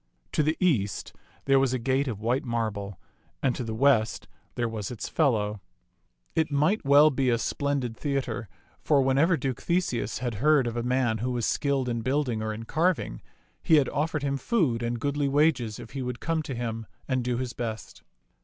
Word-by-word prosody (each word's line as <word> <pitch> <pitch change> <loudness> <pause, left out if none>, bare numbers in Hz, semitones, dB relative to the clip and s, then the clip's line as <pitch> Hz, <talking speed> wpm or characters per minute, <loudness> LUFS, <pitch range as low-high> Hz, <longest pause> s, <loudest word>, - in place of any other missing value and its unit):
To - - +2
the 155 +2 +1
east 110 - 0 0.3
there 135 0 +5
was 135 -1 +2
a - - +1
gate 130 +3 0
of 110 -5 -3
white 125 +4 +1
marble, 110 -5 -3 0.4
and 130 -3 +2
to - - -3
the 110 -1 -4
west 120 -3 +2 0.3
there 120 - 0
was 110 -3 -4
its 120 - -5
fellow. 105 -9 +1 0.7
It 160 0 +2
might 155 +9 +2
well 145 +2 +6
be 130 -2 +1
a 120 - +3
splendid 135 -1 -1
theatre, 125 -7 -3 0.3
for 140 -3 +3
whenever 145 +6 +3
Duke 135 -5 -3
Theseus 170 -9 0
had 120 -2 -3
heard 150 -2 +4
of 120 -1 -3
a 120 - -1
man 120 -2 +1
who 125 +4 -1
was 120 -3 -1
skilled 140 -3 0
in 115 -1 -1
building 130 -2 0
or 110 0 -2
in 110 +1 -6
carving, 160 - 0 0.4
he 160 - +4
had 145 -3 +4
offered 150 0 -1
him 140 -1 0
food 140 - +1
and 120 0 -2
goodly 145 +1 0
wages 135 -6 +2
if 120 -2 -10
he 135 - -4
would 125 -1 -4
come 165 -1 -1
to 140 -4 -5
him 115 -2 -4 0.2
and 130 -2 0
do 120 0 -1
his 125 -1 -3
best. 115 -2 -6
130 Hz, 195 wpm, -27 LUFS, 115-145 Hz, 0.7 s, well